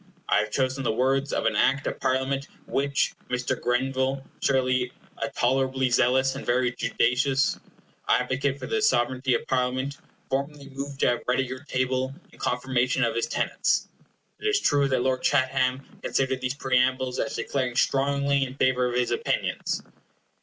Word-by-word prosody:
I -, -, +4 dB
have 105 Hz, 0 st, -1 dB
chosen 130 Hz, +3 st, 0 dB
the -, -, +1 dB
words 135 Hz, +4 st, +1 dB
of -, -, -1 dB
an -, -, +2 dB
Act 140 Hz, +1 st, +2 dB
of -, -, -3 dB
Parliament 135 Hz, +1 st, 0 dB, 0.2 s
which 140 Hz, 0 st, 0 dB, 0.2 s
Mr. 125 Hz, +1 st, -1 dB
Grenville, 130 Hz, +2 st, 0 dB, 0.2 s
surely 130 Hz, -2 st, +1 dB, 0.3 s
a -, -, -1 dB
tolerably 130 Hz, +1 st, +1 dB
zealous 130 Hz, +2 st, +3 dB
and 140 Hz, -, -6 dB
very 125 Hz, 0 st, +1 dB
judicious 125 Hz, +3 st, +1 dB, 0.5 s
advocate 130 Hz, +2 st, +1 dB
for 130 Hz, -, -7 dB
the 220 Hz, +8 st, -1 dB
sovereignty 130 Hz, -, +2 dB
of -, -, -3 dB
Parliament, 130 Hz, +2 st, -1 dB, 0.3 s
formerly 140 Hz, +1 st, -3 dB
moved 140 Hz, 0 st, -6 dB
to -, -, +4 dB
have 120 Hz, -, +1 dB
read 125 Hz, +1 st, +2 dB
at -, -, -1 dB
your 130 Hz, +1 st, -7 dB
table 130 Hz, 0 st, -1 dB, 0.2 s
in -, -, -18 dB
confirmation 125 Hz, +1 st, 0 dB
of 115 Hz, -1 st, +1 dB
his 115 Hz, 0 st, -1 dB
tenets. -, -, 0 dB, 0.5 s
It 425 Hz, -, -2 dB
is 415 Hz, -1 st, +3 dB
true 145 Hz, -, +3 dB
that 130 Hz, -2 st, +1 dB
Lord 130 Hz, 0 st, +1 dB
Chatham 130 Hz, -1 st, +1 dB, 0.2 s
considered 130 Hz, -1 st, 0 dB
these 130 Hz, +1 st, -2 dB
preambles 130 Hz, -1 st, +1 dB
as 140 Hz, -, -2 dB
declaring 130 Hz, -3 st, -2 dB
strongly 140 Hz, +1 st, +2 dB
in 130 Hz, 0 st, -5 dB
favor 130 Hz, -2 st, +2 dB
of 120 Hz, -, -3 dB
his 125 Hz, -1 st, +1 dB
opinions. -, -, -1 dB
130 Hz, 165 wpm, -26 LUFS, 125-135 Hz, 0.5 s, I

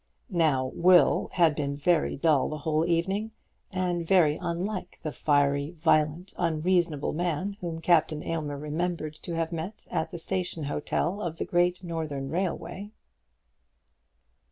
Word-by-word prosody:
Now 145 Hz, -7 st, +2 dB
Will 180 Hz, 0 st, +5 dB
had 170 Hz, -4 st, +4 dB
been 140 Hz, -1 st, -2 dB
very 155 Hz, +2 st, +1 dB
dull 145 Hz, -2 st, +3 dB
the 155 Hz, -, -4 dB
whole 155 Hz, +2 st, 0 dB
evening, 190 Hz, +6 st, 0 dB, 0.4 s
and 180 Hz, -2 st, -1 dB
very 165 Hz, -4 st, +4 dB
unlike 185 Hz, +3 st, -3 dB
the 155 Hz, -, -2 dB
fiery, 145 Hz, +2 st, +1 dB
violent, 155 Hz, +2 st, +1 dB
unreasonable 170 Hz, -2 st, +1 dB
man 175 Hz, +4 st, -1 dB
whom 165 Hz, -2 st, -4 dB
Captain 160 Hz, -3 st, +2 dB
Aylmer 150 Hz, -3 st, -3 dB
remembered 155 Hz, +1 st, -3 dB
to 170 Hz, -, -5 dB
have 165 Hz, 0 st, -1 dB
met 170 Hz, +5 st, -5 dB
at 160 Hz, -, -1 dB
the -, -, -6 dB
station 175 Hz, -1 st, -3 dB
hotel 170 Hz, +7 st, -1 dB
of 165 Hz, -4 st, -3 dB
the -, -, -2 dB
Great 175 Hz, +1 st, +1 dB
Northern 155 Hz, -5 st, -4 dB
Railway. 185 Hz, +3 st, -3 dB
165 Hz, 135 wpm, -28 LUFS, 150-180 Hz, 0.4 s, Will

